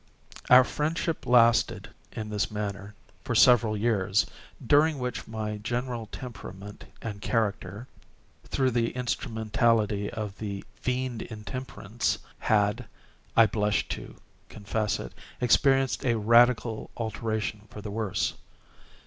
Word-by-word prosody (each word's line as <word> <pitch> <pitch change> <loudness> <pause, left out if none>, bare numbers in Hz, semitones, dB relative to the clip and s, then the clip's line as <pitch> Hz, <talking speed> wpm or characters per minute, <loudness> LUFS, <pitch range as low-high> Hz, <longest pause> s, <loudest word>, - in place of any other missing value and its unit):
Our 125 +1 +9
friendship 155 +4 -2
lasted, 120 -2 +4 0.2
in 105 -1 -6
this 100 -2 0
manner, 100 -1 -5 0.3
for - - -2
several 115 -4 +5
years, 105 -3 +2 0.4
during 150 +1 +4
which 125 -2 -4
my 110 -1 -4
general 120 +1 -3
temperament 105 -4 -9 0.2
and 105 -3 -5
character—through 115 +5 -3
the 115 -1 +1
instrumentality 110 -3 0
of 105 -3 -6
the 100 -2 -4
Fiend 125 -2 -2
Intemperance—had 110 -1 -2 0.5
(I 115 - +9
blush 105 -2 0
to - - -6 0.3
confess 105 0 -2
it) - - -7 0.3
experienced 135 +2 +3
a 120 -3 +2
radical 115 +1 +3
alteration 110 -2 -3
for 105 - -10
the 105 - -5
worse. 105 -2 -1
110 Hz, 105 wpm, -27 LUFS, 105-125 Hz, 0.5 s, Our